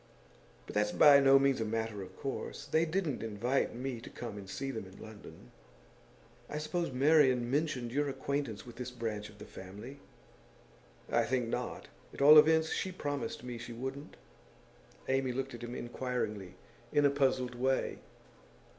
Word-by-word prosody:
'But - - -9
that's 105 0 +1
by 145 -2 +8
no 135 0 +7
means 135 -3 +2
a - - +2
matter 110 -1 -2
of 95 0 -10
course. 135 - -5
They 160 +1 +2
didn't 165 -5 -1
invite 115 +4 -1
me 125 -1 -4
to - - -9
come 115 -4 -7
and 100 -2 -9
see 135 +5 -3
them 110 -6 -6
in 95 - -14
London.' 110 -1 -12 1.0
'I 150 - -4
suppose 165 +1 -2
Marian 130 -3 +4
mentioned 135 -5 0
your 145 +2 0
acquaintance 135 -6 -3
with 120 -1 -11
this 125 0 -4
branch 110 -4 -4
of 105 - -16
the 105 - -10
family?' 105 +11 -10 1.1
'I - - +3
think 125 -3 0
not. - - -4 0.3
At - - -6
all 150 +2 +11
events, 160 +1 +4
she 190 - -2
promised 145 -8 -4
me 125 -1 -6
she 120 0 -7
wouldn't.' 135 +5 -6 0.9
Amy 135 -1 +1
looked 135 +1 -3
at 120 - -8
him 120 +1 -6
inquiringly, 120 -6 -4 0.4
in 145 0 +4
a 140 - +5
puzzled 130 -3 +1
way. 130 +2 0
130 Hz, 165 wpm, -32 LUFS, 115-140 Hz, 1.1 s, all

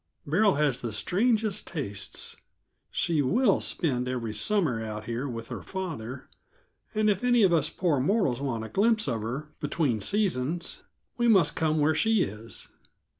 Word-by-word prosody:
Beryl 190 +7 +3
has 145 -4 +1
the 120 - -3
strangest 215 - +1
tastes. 130 - -3 0.5
She 165 -4 +1
will 205 - +3
spend 125 -7 0
every 120 -4 -3
summer 125 - +1
out 110 -1 -6
here 120 +4 -3
with 115 -1 -6
her - - -5
father, 140 -10 -6 0.7
and 215 0 +2
if 205 +1 +1
any 245 -2 +4
of 185 -3 +4
us 155 -2 +3
poor 165 -7 0
mortals 140 - +1
want 120 -5 -2
a 110 - -7
glimpse 215 -1 +2
of 115 -4 -1
her 140 +8 -5
between 145 -7 0
seasons, 175 - 0 0.4
we 240 -1 +2
must 190 -9 +4
come 155 -1 +1
where 150 +2 +3
she 215 +6 +3
is. 105 +3 -7
150 Hz, 160 wpm, -27 LUFS, 120-195 Hz, 0.7 s, any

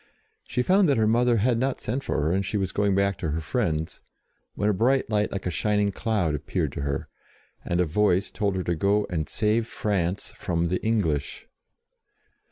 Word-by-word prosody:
She 125 - 0
found 185 +3 +4
that 140 - +3
her 110 - +3
mother 120 +2 +3
had 115 +2 +2
not 130 +1 -1
sent 130 +5 -3
for - - -1
her, 75 +2 +1
and 95 +2 +1
she 105 +2 -2
was 95 -2 -1
going 100 -1 +1
back 100 0 +1
to 80 - -2
her 80 +2 -1
friends, 80 -2 -2 0.5
when 105 - 0
a 105 - +3
bright 130 +7 +2
light 105 0 +1
like 100 - -4
a 90 - -1
shining 105 +5 +1
cloud 110 +1 -1
12 - - +2
JOAN - - +1
OF 75 - 0
ARC 75 - -3
appeared - - -2
to - - -5
her, 70 -1 -3 0.5
and 85 - -1
a 90 - +3
Voice 95 +2 +1
told 100 -3 -1
her 95 - -1
to 85 - 0
go 100 +5 +2
and 80 -3 -2
save 110 +1 +1
France 95 -4 -2
from 85 -2 -1
the 90 - -2
English. 85 -11 -1
100 Hz, 220 wpm, -25 LUFS, 85-110 Hz, 0.5 s, found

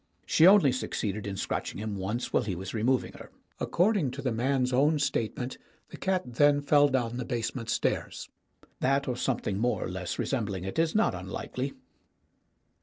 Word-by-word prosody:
She 165 - +5
only 190 -8 +7
succeeded 105 -5 -3
in 100 -1 -4
scratching - - -3
him 105 0 -4
once 100 +6 -3
while - - +4
he 100 -3 -3
was 95 +2 -6
removing 120 +4 +1
her. - - -11 0.3
According 180 - +2
to 140 - -6
the 130 - 0
man's 125 +2 0
own 145 +5 +4
statement, 130 -3 -2 0.3
the - - -10
cat 185 -1 0
then 145 +4 +3
fell 145 0 +4
down 120 -3 -1
the 125 - -2
base 115 -2 -2
ment 115 -3 -6
stairs. - - -1 0.5
That 135 +2 +1
or 125 - -1
something 120 -5 -1
more 120 +2 0
or - - -4
less 90 -1 -4
re - - -1
sembling 105 -8 -2
it 95 - -3
is 165 +2 +1
not 220 - +3
unlikely. - - -5
125 Hz, 180 wpm, -28 LUFS, 110-145 Hz, 0.5 s, only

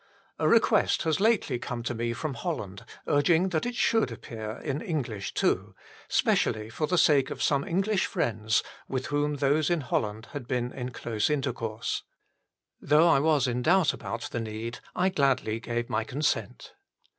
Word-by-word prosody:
A - - +2
request - - +3
has 160 0 +1
lately 200 - +2
corne 120 -1 -5
to 120 - -2
me 115 0 -2
from 145 +4 -3
Holland 115 - -5 0.2
urging 165 +5 +3
that 165 +4 -1
it 245 - -4
should 225 - +2
appear 110 -1 -7
in 145 -1 -2
English 120 - -3
too, - - 0 0.3
specially 110 0 +1
for 155 +6 -1
the 180 - +1
sake 140 -5 +4
of - - -4
some 140 -1 +2
English 195 +5 0
friends 110 -1 0 0.2
with 130 -1 -3
whom 145 0 +1
those 145 +3 +2
in 170 -2 +1
Holland 110 -3 -2
had 140 -5 -6
been 125 -1 -1
in 125 -1 -4
close 115 -2 -2
intercourse. 120 -6 -2 0.8
Though 150 +3 +4
I 160 -5 +5
was 150 -2 +3
in 125 -1 -1
doubt 175 +4 +4
about 115 - -5
the 120 - -2
need, 115 +1 -5 0.2
I 185 +1 +2
gladly 135 - +1
gave 120 0 -3
my 110 +1 0
consent. 140 +6 -2
135 Hz, 170 wpm, -28 LUFS, 115-155 Hz, 0.8 s, I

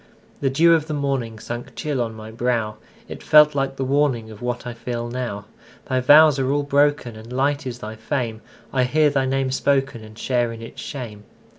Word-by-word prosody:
The 135 - +1
dew 165 +5 +5
of 160 -2 +1
the 155 - -3
morningSunk 120 -4 -4
chill 145 -5 -2
on 115 -2 -3
my 110 0 -9
brow; 115 -2 -1 0.3
It - - -8
felt 150 0 +6
like 135 -1 -1
the 135 - -2
warningOf 130 -6 0
what 120 0 -3
I 120 - -5
feel 120 0 -4
now. 120 -5 -4 0.4
Thy 130 -2 0
vows 145 +2 +6
are 130 -1 0
all 145 0 +1
broken, 145 -4 +1
And 110 +2 -11
light 140 +2 0
is 125 -1 -5
thy 110 -2 -7
fame:I 120 +1 -3
hear 150 +3 +3
thy 135 -2 +1
name 135 0 0
spokenAnd 130 -5 -1
share 120 0 0
in 115 - -8
its 115 - -9
shame. 110 -7 -7
130 Hz, 185 wpm, -22 LUFS, 115-140 Hz, 0.4 s, felt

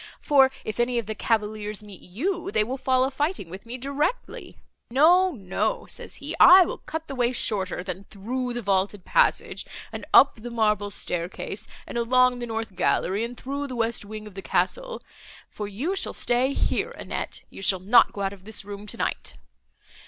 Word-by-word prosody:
for 275 -3 +5 0.2
if 215 +1 -5
any 240 0 +1
of 235 - -1
the 220 - -3
cavaliers 215 -2 -1
meet 205 -3 -12
you, 345 - -3
they 215 - +2
will 250 +5 -3
fall 260 -1 +2
a 265 - 0
fighting 290 - -2
with 195 +5 -9
me 245 +2 -5
directly. 280 - -3 0.3
No, 350 +9 +5
no,' 240 - -2
says - - -9
he, - - -6
'I 370 0 +9
will - - -4
cut 320 0 -6
the 275 - -6
way 245 -2 +1
shorter, 190 -7 -1
than 185 +1 -6
through 245 +6 -4
the 240 -1 -4
vaulted 195 0 0
passage - - +2 0.3
and - - -6
up 275 - +7
the 235 +2 -7
marble 210 -3 +1
staircase, 185 +2 -3 0.2
and 235 - -4
along 250 +1 +3
the 240 - -4
north 225 -3 -4
gallery 195 +4 +1
and 240 +1 -5
through 280 +3 -4
the 255 - -6
west 230 -1 -1
wing 215 +1 -8
of 210 - -11
the 195 - -7
castle, - - -1 0.4
for 210 - -6
you 265 - -2
shall - - -1
stay 250 +3 +2
here, - - 0
Annette; - - -5
you - - -10
shall 190 0 +2
not 210 +7 +5
go 200 - -6
out 195 0 -1
of 190 -2 -14
this 215 0 -4
room, 205 0 -8
tonight. 70 - -3
230 Hz, 190 wpm, -25 LUFS, 205-265 Hz, 0.4 s, I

